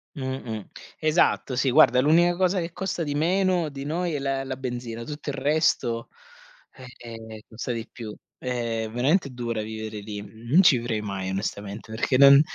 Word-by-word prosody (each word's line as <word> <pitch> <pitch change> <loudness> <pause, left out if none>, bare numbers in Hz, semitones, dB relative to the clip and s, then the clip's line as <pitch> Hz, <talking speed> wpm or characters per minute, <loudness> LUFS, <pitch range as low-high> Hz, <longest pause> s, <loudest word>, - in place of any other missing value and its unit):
Mh-mh. 130 -6 -4 0.3
Esatto. 155 -4 +2
Sì, 130 +1 +2
guarda 125 -2 +6
l'unica 170 +5 +4
cosa 185 +1 +2
che 170 -1 -4
costa 190 -2 -2
di 145 -2 -2
meno 180 +1 +2
di 140 -1 -7
noi, 170 +3 -1
è 145 - -1
la 135 0 -1
la 130 -1 -5
benzina. 120 -3 -5
Tutto 150 +1 -6
il 140 - -3
resto, 135 -5 +1 0.9
ehm, 110 -2 -9
costa 115 +3 -5
di 115 0 -4
più. 110 -3 -8 0.2
È 115 -3 -2
veramente 140 - +2
dura 120 -3 -3
vivere 110 0 -5
lì. 105 0 -6 0.3
Non 165 +8 +7
ci 140 -7 +6
vivrei 115 -2 -2
mai 100 -2 -4
onestamente, 100 +2 -4
perché 125 +3 +1
non 140 +1 +9
130 Hz, 165 wpm, -25 LUFS, 115-150 Hz, 0.9 s, non